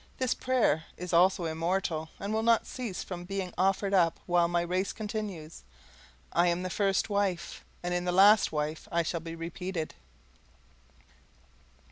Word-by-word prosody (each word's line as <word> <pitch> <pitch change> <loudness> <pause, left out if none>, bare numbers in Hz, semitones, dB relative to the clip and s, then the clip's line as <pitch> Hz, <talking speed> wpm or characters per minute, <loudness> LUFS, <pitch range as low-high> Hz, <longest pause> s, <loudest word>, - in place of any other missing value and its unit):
This 255 -2 +1
prayer 240 - +1
is 180 0 -6
also 180 +1 +4
immortal, 165 0 -1
and 200 +2 -3
will 220 - +1
not 230 0 +3
cease 235 -8 -5
from 175 -2 -6
being 190 -1 -4
offered 195 +2 +1
up 170 -4 +3
while 175 -1 +3
my 175 0 +1
race 185 +3 -1
continues. 205 -7 -5 0.7
I 175 +1 +4
am 175 +1 0
the 185 - -3
first 195 -1 +1
wife; 200 -4 -1 0.2
and 175 0 -1
in 175 0 -1
the 180 - +1
last 200 +3 +6
wife 150 +1 -3
I 170 0 +2
shall 170 +1 -2
be 165 0 -7
repeated. 165 0 -4
180 Hz, 155 wpm, -29 LUFS, 170-195 Hz, 0.7 s, last